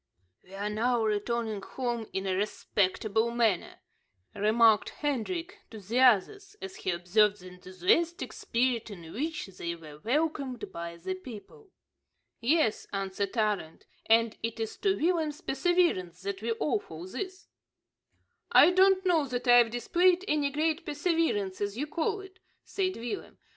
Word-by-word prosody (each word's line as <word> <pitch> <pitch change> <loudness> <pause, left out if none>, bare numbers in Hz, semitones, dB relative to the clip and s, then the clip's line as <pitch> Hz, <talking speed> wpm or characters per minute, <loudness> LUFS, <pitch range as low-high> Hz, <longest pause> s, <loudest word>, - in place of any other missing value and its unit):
"We 190 - -13
are 200 +1 -3
now 225 +2 +1
returning 215 0 -1
home 240 0 -4
in 190 0 -3
a 190 - 0
respectable 210 +2 0
manner," 230 -6 0 0.5
remarked 215 +1 +4
Hendrik 330 - -3
to 220 - -10
the 215 +5 -2
others, 325 - +3
as 385 -1 -8
he - - -4
observed 200 +4 +2
the 185 0 -11
enthusiastic 185 - 0
spirit 240 -1 -1
in 170 -5 -10
which 310 +6 -3
they 170 -3 -5
were 155 -3 -12
welcomed 275 - -2
by 170 0 -6
the 185 +3 -4
people. 245 - -11 0.7
"Yes," 245 -2 +1
answered 195 +2 -3
Arend, 210 -7 -1 0.2
"and 225 0 +4
it 230 0 -4
is 225 -1 -3
to 395 -1 +1
Willem's 320 -2 0
perseverance 270 - 0
that 200 0 -4
we 230 - -3
owe 300 - 0
all 165 - -10
this." 375 - -6 1.0
"I - - +8
don't 380 +1 +4
know 325 -6 +3
that 250 0 -4
I've 245 -1 +7
displayed 350 - +2
any 295 -2 +1
great 310 +3 0
perseverance 295 - -1
as 205 +1 -2
you 290 - -1
call 395 +7 -2
it," 380 -1 -14 0.2
said 375 -1 -2
Willem. 240 - -6
235 Hz, 145 wpm, -29 LUFS, 200-320 Hz, 1.0 s, I